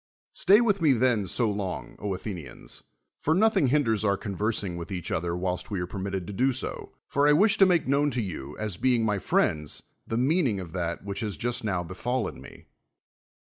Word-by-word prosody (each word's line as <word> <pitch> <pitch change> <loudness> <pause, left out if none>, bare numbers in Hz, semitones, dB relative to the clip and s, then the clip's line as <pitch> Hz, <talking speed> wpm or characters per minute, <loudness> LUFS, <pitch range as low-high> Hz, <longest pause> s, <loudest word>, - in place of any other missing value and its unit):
Stay 200 - +5
vrith 205 -5 +2
me 150 -4 +5
then, 115 -5 +2
so 115 +6 +2
long, 100 -3 -4
Athenians, 95 -5 -5 0.4
for 160 - +1
nothing 215 -7 +4
h 125 - +1
aiders 115 -8 +2
our 100 -2 +2
conversing 100 -2 -1
vrith 85 -1 -6
each 90 -4 -4
other, 85 +1 -1
whilst 90 0 -2
we 100 -3 -2
are 90 - -1
permitted 95 0 -4
to 100 - -7
do 130 +7 +2
so: 130 - -4
for 140 +1 +2
I 150 - +6
wish 205 +7 +4
to 195 - +8
make 175 -6 +2
known 140 +2 +3
to - - +2
you, 75 -7 -6
as 105 -5 -3
being 120 -1 +2
my 105 -2 +1
friends, 75 -3 0 0.2
the 115 - -2
meaning 130 - +2
of 90 -3 -7
that 85 -1 -3
which 100 0 -5
has 105 -4 -3
just 120 0 -1
now 90 -5 -1
befallen 120 +9 -3
me. - - -13
105 Hz, 200 wpm, -27 LUFS, 95-130 Hz, 0.4 s, to